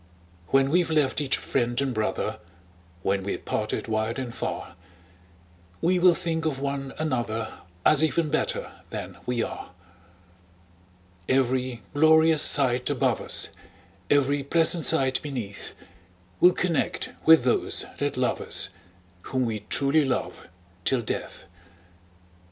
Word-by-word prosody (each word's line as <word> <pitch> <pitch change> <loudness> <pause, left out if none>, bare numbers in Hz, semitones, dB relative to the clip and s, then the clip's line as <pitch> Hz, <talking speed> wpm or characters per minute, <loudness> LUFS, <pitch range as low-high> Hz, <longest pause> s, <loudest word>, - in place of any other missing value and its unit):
When 135 +4 +3
we've 175 0 +2
left 150 -2 +1
each 140 -2 +2
friend 120 -2 -1
and 135 -2 0
brother, 110 -1 -2 0.6
When 100 0 +1
we're 100 +1 -3
parted - - -3
wide 110 +2 -1
and 125 -3 -5
far, - - -5 1.1
We 180 +2 +2
will 180 -1 +6
think 165 -1 -2
of 155 -4 -1
one 140 -1 -3
another, 120 -7 -2 0.3
As 155 0 +5
even 160 -1 +1
better - - -1 0.2
than - - -7
we 120 -2 0
are. - - -6 1.6
Every 130 -2 0
glorious 160 +1 +5
sight 125 -3 +3
above - - +1
us, - - 0 0.6
Every 145 0 +3
pleasant 165 +3 +3
sight 135 -5 +3
beneath, 120 -9 -6 0.6
We'll 180 0 +6
connect 175 -3 -1 0.2
with 160 -5 +8
those 125 - +1
that - - -1
love - - 0
us, - - -1 0.6
Whom 130 -1 0
we 110 -2 -2
truly 140 +2 +2
love 130 -2 -3 0.4
till 125 +2 +1
death! - - -5
135 Hz, 125 wpm, -26 LUFS, 125-160 Hz, 1.6 s, with